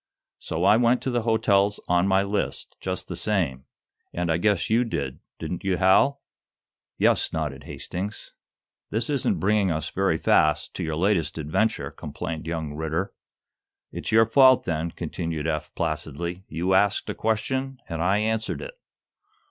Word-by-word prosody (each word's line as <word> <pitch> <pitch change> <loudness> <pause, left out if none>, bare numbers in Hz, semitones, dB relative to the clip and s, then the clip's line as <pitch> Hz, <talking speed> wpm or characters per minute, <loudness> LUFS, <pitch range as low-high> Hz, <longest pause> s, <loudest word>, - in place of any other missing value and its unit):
So 80 +2 -3
I 100 +3 +6
went 120 +1 +3
to 130 - -1
the 120 -1 +1
hotels 105 -3 +2
on 90 +2 +3
my 95 0 +3
list, 100 +1 -3
just - - -4
the - - -5
same, 80 -12 -1 0.5
and 85 -1 -1
I 80 - +2
guess 100 0 +1
you 115 +3 +3
did, 70 - -3 0.2
didn't 90 - -5
you, 95 -2 +1
Hal?" 95 +10 +4 0.7
"Yes," - - +2
nodded 75 -4 -3
Hastings. 100 +4 -6 0.6
"This 115 +6 -1
isn't 140 -3 +1
bringing 105 -1 +2
us, 80 -2 -2
very 95 -4 +1
fast, 75 -1 +2
to - - -4
your 80 -1 -2
latest 90 -1 +1
adventure," 80 +9 0
complained 80 -1 -6
young 80 -3 -3
Ridder. 80 +5 -2 0.8
"It's - - -5
your 115 0 +6
fault, 130 +2 +6
then," 80 0 -2
continued 80 -2 -4
Eph, 75 -2 -2
placidly. 85 +3 -3
"You 85 +4 -1
asked 100 +1 +3
a - - -2
question, 130 +5 -1
and 80 -2 -4
I 95 +4 +3
answered 110 +1 -1
it." - - -7
95 Hz, 155 wpm, -25 LUFS, 80-110 Hz, 0.8 s, I